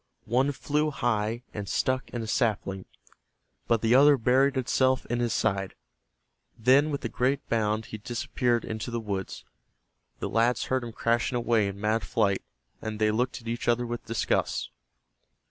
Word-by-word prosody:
One 130 Hz, +5 st, +2 dB
flew 150 Hz, +2 st, 0 dB
high 115 Hz, -3 st, -1 dB
and 100 Hz, -2 st, -5 dB
stuck 130 Hz, 0 st, 0 dB
in 120 Hz, -2 st, -4 dB
a -, -, -6 dB
sapling, 105 Hz, -5 st, -1 dB, 0.8 s
but 115 Hz, -2 st, +2 dB
the 115 Hz, +1 st, +4 dB
other 140 Hz, +2 st, +7 dB
buried 130 Hz, +3 st, +3 dB
itself 130 Hz, +1 st, +2 dB
in 120 Hz, -, 0 dB
his 120 Hz, -1 st, 0 dB
side. 95 Hz, -2 st, 0 dB, 0.8 s
Then 130 Hz, +6 st, +4 dB
with 140 Hz, -4 st, -3 dB
a -, -, +2 dB
great 130 Hz, +4 st, -1 dB
bound 110 Hz, -1 st, 0 dB
he 110 Hz, -, -8 dB
disappeared 120 Hz, +1 st, -1 dB
into 110 Hz, +2 st, -4 dB
the 120 Hz, 0 st, -2 dB
woods. 100 Hz, -4 st, -5 dB, 0.7 s
The -, -, -3 dB
lads 115 Hz, +2 st, +2 dB
heard 130 Hz, -1 st, -1 dB
him 120 Hz, -, -6 dB
crashing 115 Hz, +2 st, 0 dB
away 115 Hz, -3 st, +2 dB
in 100 Hz, 0 st, -6 dB
mad 110 Hz, +2 st, +1 dB
flight, 100 Hz, -4 st, +1 dB, 0.4 s
and 110 Hz, -1 st, -4 dB
they 110 Hz, 0 st, +2 dB
looked 125 Hz, +3 st, -1 dB
at 115 Hz, -, -13 dB
each 120 Hz, +1 st, -3 dB
other 120 Hz, +1 st, +2 dB
with 120 Hz, -1 st, -5 dB
disgust. 115 Hz, 0 st, -1 dB
115 Hz, 165 wpm, -27 LUFS, 110-125 Hz, 0.8 s, other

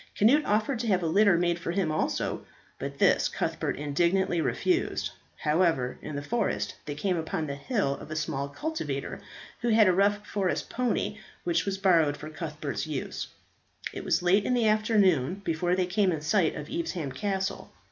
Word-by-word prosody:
Cnut 270 Hz, +9 st, +4 dB
offered 215 Hz, +4 st, +1 dB
to 235 Hz, -, -2 dB
have 185 Hz, -4 st, +2 dB
a -, -, +1 dB
litter 200 Hz, +2 st, +5 dB
made 175 Hz, 0 st, +1 dB
for 170 Hz, -, -5 dB
him 180 Hz, -3 st, 0 dB
also, 155 Hz, -, -1 dB, 0.4 s
but -, -, -5 dB
this -, -, +4 dB
Cuthbert -, -, -2 dB
indignantly 170 Hz, +5 st, +1 dB
refused; 355 Hz, -, 0 dB, 0.3 s
however, 150 Hz, -5 st, +1 dB
in 150 Hz, -, -6 dB
the 145 Hz, -, -3 dB
forest 230 Hz, +6 st, -1 dB
they 145 Hz, -, -3 dB
came 180 Hz, +4 st, 0 dB
upon 160 Hz, 0 st, -2 dB
the 140 Hz, -2 st, -4 dB
hut 140 Hz, -, -1 dB
of -, -, -10 dB
a 155 Hz, -, -4 dB
small 140 Hz, -3 st, -2 dB
cultivator, 315 Hz, -, -4 dB, 0.4 s
who 240 Hz, -, -1 dB
had 220 Hz, -2 st, +6 dB
a 185 Hz, -, +5 dB
rough 205 Hz, +2 st, +2 dB
forest 195 Hz, -3 st, -2 dB
pony, 250 Hz, -1 st, -1 dB, 0.2 s
which 345 Hz, -1 st, +1 dB
was 195 Hz, -1 st, -1 dB
borrowed 165 Hz, -7 st, +3 dB
for 155 Hz, +1 st, -8 dB
Cuthbert's 155 Hz, -1 st, -4 dB
use. 145 Hz, -4 st, -4 dB, 0.7 s
It -, -, -6 dB
was -, -, +1 dB
late 190 Hz, +3 st, +4 dB
in 250 Hz, -, +1 dB
the 235 Hz, -3 st, +3 dB
afternoon 200 Hz, -, +2 dB
before 175 Hz, +1 st, 0 dB
they 185 Hz, -1 st, +1 dB
came 190 Hz, +1 st, +2 dB
in 160 Hz, -3 st, -2 dB
sight 160 Hz, +1 st, +2 dB
of 150 Hz, -, -6 dB
Evesham 190 Hz, -, -3 dB
Castle. 190 Hz, +7 st, -3 dB
180 Hz, 180 wpm, -28 LUFS, 155-210 Hz, 0.7 s, had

